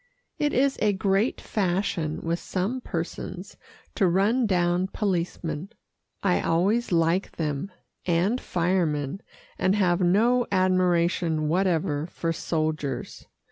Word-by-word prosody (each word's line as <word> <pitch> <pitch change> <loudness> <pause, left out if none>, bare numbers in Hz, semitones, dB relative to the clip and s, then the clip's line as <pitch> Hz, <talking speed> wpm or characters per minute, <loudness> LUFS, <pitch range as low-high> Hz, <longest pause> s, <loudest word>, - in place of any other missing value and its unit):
It 295 0 +1
is 270 +1 +2
a 210 -1 +3
great 195 +4 +1
fashion 180 -5 -1
with 170 +1 -1
some 205 +8 -2
persons 180 +2 -5 0.4
to 190 - +2
run 210 +7 +2
down 180 -1 +1
policemen. 175 -4 -2 0.5
I 185 -3 +2
always 195 +9 +1
like 170 +2 +1
them 155 +3 -3 0.4
and 185 +8 +1
firemen, 170 -3 0 0.4
and 190 +2 +2
have 180 -3 +2
no 230 +7 +3
admiration 175 -4 +2
whatever 160 -4 +1
for 165 -1 -2
soldiers. 155 -3 -3
180 Hz, 110 wpm, -26 LUFS, 165-195 Hz, 0.5 s, a